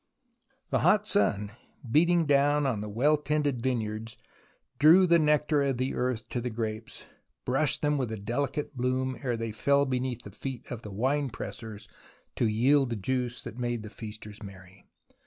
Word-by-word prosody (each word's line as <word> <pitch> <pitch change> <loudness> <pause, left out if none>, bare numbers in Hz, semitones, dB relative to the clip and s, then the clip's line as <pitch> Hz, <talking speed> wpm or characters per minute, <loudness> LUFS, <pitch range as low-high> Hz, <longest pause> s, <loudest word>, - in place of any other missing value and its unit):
The - - +2
hot 210 0 +4
sun, 105 - +1 0.4
beating 170 +6 +3
down 145 0 +3
on 120 -6 0
the 105 - -5
well 140 +9 +3
tended 145 -3 -1
vineyards, 115 -3 -3 0.6
drew 165 +6 +7
the 170 -1 +5
nectar 150 -1 +2
of 135 -3 0
the 130 +2 -1
earth 125 -3 -2
to 125 -5 -2
the 125 - -2
grapes, 110 -1 -5 0.4
brushed 135 +5 0
them 150 -1 +2
with 125 -4 -2
a 110 - -3
delicate 135 +7 -3
bloom 130 +1 -1
ere 120 -3 -1
they 115 -1 -3
fell 140 +6 +2
beneath 125 -2 -2
the 100 - -10
feet 130 +4 -6
of 120 -2 -5
the 105 - -8
winepressers 115 -2 -3 0.5
to 115 - +1
yield 130 +5 +3
the 115 - -2
juice 125 +3 -2
that 115 +1 -8
made 120 -2 -2
the 105 - -9
f - - -21
casters 105 -1 -9
merry. 95 -1 -12
125 Hz, 175 wpm, -28 LUFS, 110-145 Hz, 0.6 s, drew